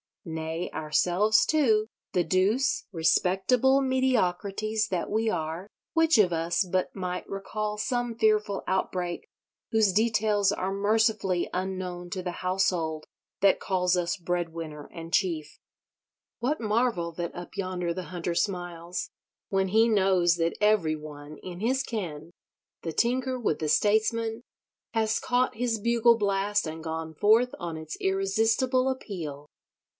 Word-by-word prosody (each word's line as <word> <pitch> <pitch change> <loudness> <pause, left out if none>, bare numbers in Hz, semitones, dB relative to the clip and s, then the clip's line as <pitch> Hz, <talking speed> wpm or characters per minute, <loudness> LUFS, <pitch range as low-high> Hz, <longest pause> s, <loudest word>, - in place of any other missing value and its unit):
Nay, 160 +1 -4
ourselves, 180 +7 +2
too—the 220 - +1
douce, 195 +10 +1
respectable 190 +10 +3
mediocrities 220 -5 0
that 180 -3 -2
we 220 +1 +1
are—which 195 - 0
of 185 -4 +5
us 170 +4 +1
but 185 0 -1
might 180 -2 -4
recall 210 +2 -4
some 240 +1 -1
fearful 215 -2 +1
outbreak 180 -2 -2 0.4
whose 220 -3 +4
details 210 -1 +2
are 190 +1 -2
mercifully 205 -2 +1
unknown 180 -1 -4
to 185 - -3
the 180 - -2
household 180 -4 0 0.4
that 195 -1 +5
calls 180 -1 +1
us 175 +1 -1
breadwinner 165 -4 -4
and 165 -1 -8
chief? 165 -5 0 0.8
What 265 +6 0
marvel 215 -6 0
that 170 +1 -4
up 175 0 -8
yonder 185 -3 -2
the 185 0 -5
Hunter 175 -1 -3
smiles? 175 -2 -2 0.4
When 195 -1 +1
he 220 +4 +4
knows 190 -5 +3
that 165 -1 -1
every 210 -7 +3
one 150 -1 -10
in 180 -1 -7
his 260 +4 +1
ken, 175 - -5 0.5
the 165 - -3
tinker 255 +4 0
with 215 -10 0
the 155 - -1
statesman, 220 +4 +2 0.5
has 220 -1 +1
caught 250 -1 +1
his 230 -1 -1
bugle 235 +1 +4
blast 200 -2 0
and 160 0 -6
gone 160 0 -4
forth 225 +8 +4
on 170 -3 -4
its 155 0 -7
irresistible 225 +7 +1
appeal! 165 - -5
190 Hz, 130 wpm, -27 LUFS, 175-220 Hz, 0.8 s, of